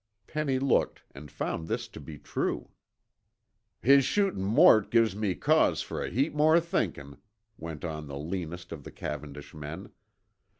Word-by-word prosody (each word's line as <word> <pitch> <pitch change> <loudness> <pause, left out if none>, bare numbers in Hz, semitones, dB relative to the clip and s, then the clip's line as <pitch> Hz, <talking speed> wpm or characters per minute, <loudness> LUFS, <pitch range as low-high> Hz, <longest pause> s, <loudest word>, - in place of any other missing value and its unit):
Penny 150 -4 -1
looked 135 0 +1
and 75 +2 -10
found 80 0 -4
this 115 +1 -2
to 105 - -11
be 75 +1 -9
true. - - -3 1.1
"His 140 +2 +6
shootin' 195 - +1
Mort 110 -1 +6
gives 115 -4 +3
me 100 -3 -1
cause - - +3
fer - - -4
a - - -3
heap 135 +6 0
more 155 +2 +5
thinkin'," 70 - -3 0.4
went 80 0 -6
on 75 -2 -5
the 70 -1 -6
leanest 85 +2 -5
of 80 -4 -7
the - - -9
Cavendish 75 0 -7
men. 75 +5 -8
95 Hz, 155 wpm, -29 LUFS, -, 1.1 s, His